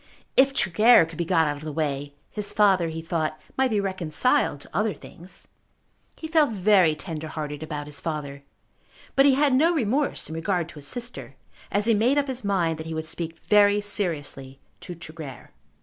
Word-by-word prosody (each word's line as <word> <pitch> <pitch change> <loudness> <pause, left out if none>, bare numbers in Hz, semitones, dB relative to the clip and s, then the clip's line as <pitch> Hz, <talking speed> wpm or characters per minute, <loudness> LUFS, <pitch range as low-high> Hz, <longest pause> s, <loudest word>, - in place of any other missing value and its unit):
If 270 +1 +5
Tregear 215 0 +5
could 165 0 -11
be 170 - 0
got 165 -2 +3
out 145 0 -2
of 145 - -11
the 155 - -4
way, 145 -2 -3 0.2
his 210 -1 -4
father, 190 -5 +3
he 160 0 -6
thought, 160 -2 -2 0.2
might 265 0 +2
be 215 -3 +1
reconciled 190 - +1
to - - -14
other 210 +2 +1
things. 180 +2 -11 0.7
He 320 - -7
felt 315 -2 +3
very 190 -5 +4
tender 160 -1 -6
hearted 150 -1 -5
about 150 -2 -5
his 150 -1 -5
father; 145 -3 -5 0.7
but 275 +1 +6
he 270 - +5
had 285 -1 +3
no 325 +6 +4
remorse 275 +2 0
in 160 - -7
regard 170 0 -1
to 165 - -13
his 145 - -5
sister 245 +5 -6 0.4
as 205 +1 +1
he 230 - +4
made 235 +7 +2
up 285 -1 +1
his 260 -1 -4
mind 175 -6 0
that 160 - -6
he 160 - -4
would 160 0 -3
speak 165 0 -4
very 205 -1 +5
seriously 145 -10 -3 0.2
to 175 - -8
Tregear. 155 -4 -10
175 Hz, 195 wpm, -25 LUFS, 155-215 Hz, 0.7 s, but